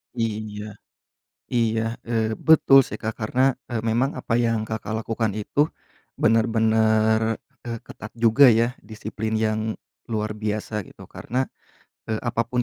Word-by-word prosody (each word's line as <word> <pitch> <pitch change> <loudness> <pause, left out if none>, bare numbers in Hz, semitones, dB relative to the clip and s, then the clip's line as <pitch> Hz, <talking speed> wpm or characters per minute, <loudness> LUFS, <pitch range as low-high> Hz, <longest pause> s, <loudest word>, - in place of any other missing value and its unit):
Iya. 105 -2 -4 0.7
Iya, 115 -1 0
eee, 110 -1 0
betul 140 -4 +6
sih, 105 - -6
Kak. 110 +1 -3
Karena 130 +4 +2 0.2
e - - -6
memang 120 +5 +1
apa 115 - -3
yang 115 -2 +1
Kakak 110 0 -4
lakukan 110 -2 -1
itu 140 +8 +1 0.5
benar-benar 110 0 +3 0.3
e 120 - -5 0.2
ketat 110 - -10
juga 115 +4 +6
ya, 115 +2 +2
disiplin 110 0 -5
yang 110 0 0 0.5
luar 110 -1 -2
biasa 105 0 -2
gitu. - - -14
Karena 130 +2 -2 0.7
e 110 - 0
apapun 120 +1 -1
110 Hz, 130 wpm, -24 LUFS, 110-115 Hz, 0.7 s, betul